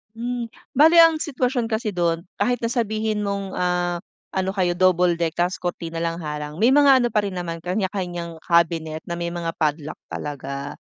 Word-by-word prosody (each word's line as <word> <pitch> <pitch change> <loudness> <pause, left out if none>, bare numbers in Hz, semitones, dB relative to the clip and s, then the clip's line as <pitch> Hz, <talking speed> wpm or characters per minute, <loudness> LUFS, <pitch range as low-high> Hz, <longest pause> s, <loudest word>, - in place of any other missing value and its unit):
Hmm, 240 +1 -3 0.3
bale 325 +3 +8
ang 330 -1 +6
sitwasyon 255 -5 -1
kasi 220 0 -1
dun, 170 -3 0 0.2
kahit 245 0 0
na 230 - 0
sabihin 220 -3 -1
mong, 200 -1 -2
ah, 180 -1 0 0.4
ano 190 0 0
kayo 180 -3 +1
double 180 -1 +4
deck 165 -2 -1
tapos 175 0 +1
kurtina 170 -2 -4
na 165 0 0
lang - - -7
harang 150 0 -5
may 235 - +6
mga 285 -2 +7
ano 240 - +2
pa 210 - +3
rin 200 -2 -4
naman 165 -2 -4
kanya-kanyang 180 -3 -3
cabinet 165 -2 +1
na - - -2
may 170 0 -2
mga 170 -1 -3
padlock 155 -1 -1
talaga. 140 0 -5
180 Hz, 180 wpm, -23 LUFS, 165-220 Hz, 0.4 s, bale